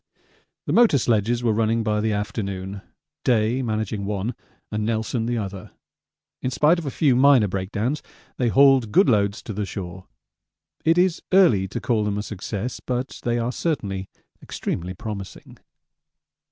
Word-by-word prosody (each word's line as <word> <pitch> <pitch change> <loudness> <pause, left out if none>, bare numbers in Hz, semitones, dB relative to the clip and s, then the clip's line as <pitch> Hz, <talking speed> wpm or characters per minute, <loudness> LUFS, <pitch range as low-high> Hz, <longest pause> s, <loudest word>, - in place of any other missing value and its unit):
The - - -1
motor 230 -11 +5
sledges 120 0 +1
were 115 -2 +2
running 115 +1 +1
by 105 -1 0
the 110 0 0
afternoon, 100 -2 -4 0.4
Day 120 +1 +2
managing 110 -3 -2
one 105 +3 -2 0.4
and 105 0 -1
Nelson 115 +1 -1
the 120 0 0
other. 100 -3 -6 0.7
In 130 - -1
spite 150 +6 +3
of 160 - -6
a - - 0
few 135 0 +2
minor 130 -4 +5
breakdowns 105 +9 -2 0.4
they 125 - +1
hauled 135 -2 +5
good 175 - +5
loads 100 -3 +1
to 110 - -6
the 105 +1 -2
shore. 95 -2 -7 0.8
It 165 +2 +3
is 180 -1 +2
early 170 - +5
to - - -4
call 115 -3 0
them 105 -1 -1
a 105 - -2
success, 105 +3 -5
but 125 +1 -4
they 120 0 0
are 120 +1 -1
certainly 100 - -3 0.3
extremely 90 +2 -4
promising. 100 -1 -8
110 Hz, 155 wpm, -23 LUFS, 100-125 Hz, 0.8 s, motor